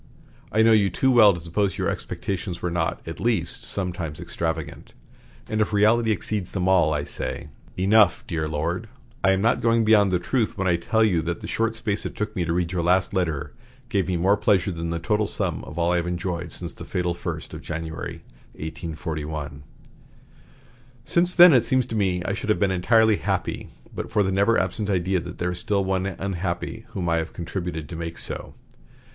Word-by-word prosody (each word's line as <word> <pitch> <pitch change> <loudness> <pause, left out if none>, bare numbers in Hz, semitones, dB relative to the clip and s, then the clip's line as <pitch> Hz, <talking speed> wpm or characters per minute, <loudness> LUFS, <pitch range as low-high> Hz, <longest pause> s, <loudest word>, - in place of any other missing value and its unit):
I 110 +1 +4
know 115 - +6
you 105 -3 +4
too 130 +9 +2
well 110 -5 +8
to 85 - -4
suppose 95 +4 -1
your - - -1
expectations 90 -2 -4
were 90 - -2
not, 80 -1 -1
at 80 - -6
least, 110 -8 -1
sometimes 90 -6 -3
extravagant; 80 -2 -4 0.5
and 110 0 -1
if 105 - +2
the 105 - -2
reality 110 +3 +4
exceeds 105 -2 -1
them 95 -2 -2
all, 90 -5 +4
I 75 -1 0
say, 75 - -5 0.3
Enough, 100 0 +4
dear 80 -2 -2
Lord. 85 +8 -2 0.3
I 95 - +5
am 95 +1 +1
not 115 +1 +2
going 115 -1 +3
beyond 105 -3 +5
the 90 - +3
truth 110 +5 -1
when 95 - -1
I 90 - +4
tell 110 +6 +1
you 90 -7 +2
that 85 +1 -3
the - - -6
short 115 0 0
space 110 -2 -1
it - - -5
took 105 0 -3
me 90 - 0
to 80 - -1
read 85 0 0
your 90 -2 -1
last 90 +3 +2
letter 80 -7 -1 0.4
gave 100 -5 0
me 90 -2 0
more 95 +4 +3
pleasure 100 -2 +2
than 85 -1 -4
the 85 - -1
total 105 +5 0
sum - - -2
of - - -10
all 85 0 +2
I 90 - +2
have 85 0 -1
enjoyed 85 -1 -3
since 85 -1 -5
the - - -9
fatal 90 -1 -1
first 85 - -6
of - - -7
January, 80 0 -6 0.3
1841. 80 -2 -5 1.4
Since 175 +1 +2
then 175 -2 +9
it 125 -3 +5
seems 130 +1 +1
to 115 - -5
me 95 -4 +1
I 100 - -1
should 110 - -4
have 105 - +2
been 100 -2 +2
entirely 110 +3 +4
happy, - - -2 0.2
but - - -5
for 105 -2 +3
the 95 - 0
never 100 +4 +3
absent 105 -2 0
idea 95 -1 +1
that - - -8
there 90 +1 -1
is 90 - -4
one 95 -2 +1
still 95 0 -4
unhappy 95 +4 -3
whom 95 -5 -2
I 85 0 +2
have 80 0 -3
contributed 85 -2 -4
to 85 - -7
make 85 0 -5
so. - - -4
95 Hz, 210 wpm, -24 LUFS, 85-105 Hz, 1.4 s, then